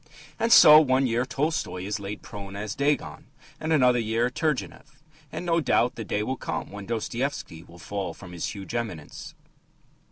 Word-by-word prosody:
And 230 - +1
so 155 -7 +10
one 135 -2 +2
year 120 +1 0
Tolstoy 145 - -2
is 105 +3 -3
laid 100 +1 -7
prone 100 -1 -8
as 105 0 -4
Dagon, 140 +1 -1 0.3
and, 160 +1 -3
another 125 -5 +4
year, 115 +2 0
Turgenev. 150 -1 -3 0.3
And, - - -5
no 170 -1 +2
doubt, 125 -4 +2
the 115 - -6
day 105 0 -2
will 130 +4 -3
come - - -4
when 100 -1 -8
Dostoevsky 115 - -3
will 85 0 -16
fall 95 -1 -5
from 90 - -12
his 85 -2 -4
huge 95 -3 -8
eminence. 105 -11 -5
115 Hz, 170 wpm, -26 LUFS, 100-140 Hz, 0.3 s, so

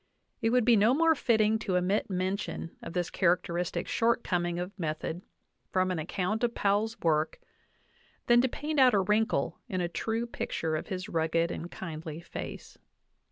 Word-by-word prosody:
It 225 - +2
would 245 -1 +3
be 240 -1 +6
no 220 +5 +4
more 325 +1 +5
fitting 220 -6 +2
to 190 -4 0
omit 195 +5 0
men 185 +1 0
tion 200 -4 -6
of - - -7
this 175 -1 -1
characteristic 175 -1 0
shortcoming 180 -7 +1
of 180 +2 -3
method 160 +1 -3 0.5
from 185 0 +1
an 180 - -1
ac 155 - -5
count 210 +5 -1
of 240 -1 +1
Powell's 210 +3 +1
work 155 -1 +1 0.9
than 240 0 +6
to 260 - +1
paint 300 +3 -2
out 255 -4 +6
a - - +4
wrinkle 210 +4 +1
in 185 -4 -1
a 175 - 0
true 225 +6 -2
picture 160 -8 -3
of 155 - -4
his 185 -3 -4
rugged 165 +1 +1
and 170 - -5
kindly 160 -3 -6
face. 170 - -8
185 Hz, 175 wpm, -29 LUFS, 170-225 Hz, 0.9 s, be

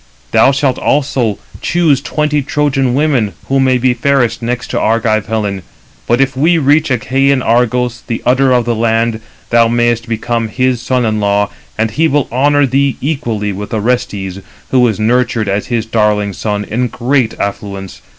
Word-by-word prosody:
Thou - - +5
shalt 135 -2 0
also 130 -7 0 0.2
choose 160 -6 +2
twenty 150 0 -1
Trojan 135 -3 0
women, 135 - +1 0.2
who 135 0 +2
may 130 -1 +3
be 125 0 +2
fairest 125 -2 +1
next 125 +1 -3
to - - 0
Argive 110 -1 +1
Helen. 105 -3 -2 0.5
But 120 +1 +2
if 135 -1 +1
we 165 +6 +3
reach 150 +1 +2
Achæan 135 +1 +1
Argos, 120 +1 +1
the 115 - -3
udder 130 +1 +3
of 125 -2 +2
the 120 - 0
land, 115 0 0 0.3
thou 115 -1 +5
mayest 120 0 0
become 115 0 -1
his 125 +2 0
son 125 0 0
in 110 -1 0
law, 100 0 +1 0.3
and 110 0 0
he 160 +8 +2
will 145 -2 +1
honour 145 +3 +3
thee 135 +1 +1
equally 115 -9 -2
with 105 +3 -5
Orestes, 100 -4 -2 0.3
who 125 -2 +4
is 110 -3 -2
nurtured 115 0 +1
as 100 +1 -1
his 115 -2 -1
darling 105 -2 0
son, 105 +1 -3
in 120 +5 -1
great 125 0 -1
affluence. 100 -1 -5
120 Hz, 170 wpm, -14 LUFS, 110-135 Hz, 0.5 s, Thou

